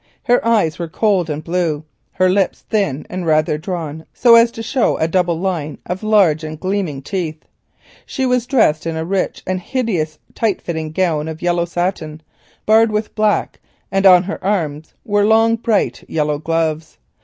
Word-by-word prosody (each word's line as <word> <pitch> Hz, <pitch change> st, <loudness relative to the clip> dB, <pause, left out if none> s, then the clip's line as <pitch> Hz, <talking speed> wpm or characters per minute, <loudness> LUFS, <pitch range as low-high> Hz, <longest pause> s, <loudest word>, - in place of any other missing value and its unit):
Her 245 Hz, 0 st, +2 dB
eyes 215 Hz, -8 st, +1 dB
were 170 Hz, -, -3 dB
cold 185 Hz, -1 st, +1 dB
and 150 Hz, +1 st, -4 dB
blue, 165 Hz, -3 st, -1 dB, 0.3 s
her 185 Hz, 0 st, +2 dB
lips 190 Hz, +1 st, +1 dB
thin 195 Hz, -, -1 dB
and 185 Hz, 0 st, -5 dB
rather 155 Hz, -2 st, +1 dB
drawn, 160 Hz, -3 st, -5 dB
so 240 Hz, -2 st, +5 dB
as 230 Hz, 0 st, +7 dB
to 225 Hz, -, -6 dB
show 250 Hz, +2 st, +1 dB
a 160 Hz, -, +1 dB
double 175 Hz, -1 st, 0 dB
line 170 Hz, -5 st, -3 dB
of 180 Hz, +1 st, -4 dB
large 200 Hz, -8 st, +3 dB
and 155 Hz, 0 st, -6 dB
gleaming 185 Hz, -8 st, -2 dB
teeth. 165 Hz, -3 st, -4 dB, 0.6 s
She 265 Hz, -, -3 dB
was 250 Hz, -1 st, +1 dB
dressed 165 Hz, -, +2 dB
in 165 Hz, -1 st, -3 dB
a 160 Hz, -, -3 dB
rich 190 Hz, +2 st, -2 dB
and 185 Hz, 0 st, -2 dB
hideous 180 Hz, -, -2 dB, 0.2 s
tight 220 Hz, -4 st, 0 dB
fitting 160 Hz, -2 st, -4 dB
gown 160 Hz, -3 st, 0 dB
of 160 Hz, +1 st, -7 dB
yellow 175 Hz, -1 st, +1 dB
satin, 170 Hz, -3 st, -3 dB, 0.4 s
barred 220 Hz, +1 st, +5 dB
with 210 Hz, 0 st, -2 dB
black, 215 Hz, -2 st, 0 dB, 0.3 s
and 195 Hz, +1 st, +3 dB
on 180 Hz, -1 st, +7 dB
her 195 Hz, +3 st, -6 dB
arms 160 Hz, -6 st, -2 dB
were 205 Hz, -1 st, +2 dB
long 225 Hz, +2 st, +4 dB
bright 225 Hz, -2 st, 0 dB
yellow 150 Hz, -2 st, -1 dB
gloves. 160 Hz, 0 st, -2 dB
180 Hz, 175 wpm, -18 LUFS, 160-210 Hz, 0.6 s, as